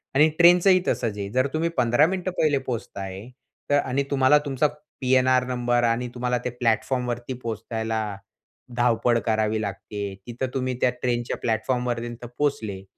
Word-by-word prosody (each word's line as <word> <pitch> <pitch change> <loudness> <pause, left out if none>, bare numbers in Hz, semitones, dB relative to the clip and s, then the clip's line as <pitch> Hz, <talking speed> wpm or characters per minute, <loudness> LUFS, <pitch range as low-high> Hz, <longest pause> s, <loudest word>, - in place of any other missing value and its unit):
आणि 150 +3 +6
ट्रेनचंही, 180 +2 +6
तसंच 110 -4 -1
आहे. 100 -1 -4
जर 130 +2 +2
तुम्ही 160 +2 0
15 120 +4 +4
मिनिटं 185 0 -2
पहिले 150 -3 +3
पोहोचता 120 -6 -5
आहे, 95 +4 -7 0.4
तर 145 0 +4
आणि 135 0 -1
तुम्हाला 135 +1 +5
तुमचा 140 +1 +1 0.3
पी-एन-आर 130 0 +3
नंबर, 120 -1 +1
आणि 120 +1 +1
तुम्हाला 125 0 0
ते - - +1
प्लॅटफॉर्मवरती 120 +1 -1
पोहोचायला 110 0 -3 0.8
धावपळ 120 0 +2
करावी 110 -1 +1
लागते. 100 0 -5
तिथं 120 +2 -3
तुम्ही 130 -1 -1
त्या - - +4
ट्रेनच्या 120 -1 -1
प्लॅटफॉर्म 125 +2 0
पर्यन्त 120 0 -4
पोचले, 110 -10 -1
125 Hz, 150 wpm, -24 LUFS, 115-130 Hz, 0.8 s, आणि